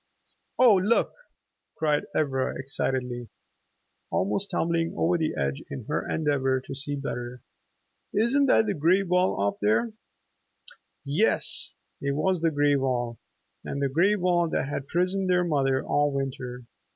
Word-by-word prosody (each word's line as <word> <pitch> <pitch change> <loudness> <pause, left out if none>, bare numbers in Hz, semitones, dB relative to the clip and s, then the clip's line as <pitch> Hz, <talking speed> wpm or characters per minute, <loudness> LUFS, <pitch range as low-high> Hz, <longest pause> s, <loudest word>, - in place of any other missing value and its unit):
"Oh, 250 -3 +7
look," 205 +5 +1 0.6
cried 150 -2 +1
Ivra 135 -4 0
excitedly, 125 -2 -2 0.8
almost 105 - -1
tumbling 165 -2 0
over 175 +2 +2
the 160 -2 -1
edge 70 -1 -1
in - - -7
her - - -2
endeavor 135 -4 +1
to 130 - -8
see 145 +2 0
better, 125 -3 -5 0.7
"isn't 250 +7 +2
that 225 - +4
the 205 - 0
gray 175 +4 +3
wall 180 - +1
off 100 0 0
there?" 110 - +1 1.1
Yes, 150 +11 +1 0.3
it 140 0 -1
was 175 +3 0
the 165 - +3
gray 145 -1 +2
wall, 125 -3 -1 0.4
the 140 -1 -2
gray 190 +7 +4
wall 175 -3 +1
that 135 - -1
had 140 -1 -4
prisoned 185 +3 0
their 180 0 +3
mother 135 -5 +1
all 145 0 +1
winter. 130 -2 -4
145 Hz, 140 wpm, -26 LUFS, 130-180 Hz, 1.1 s, Oh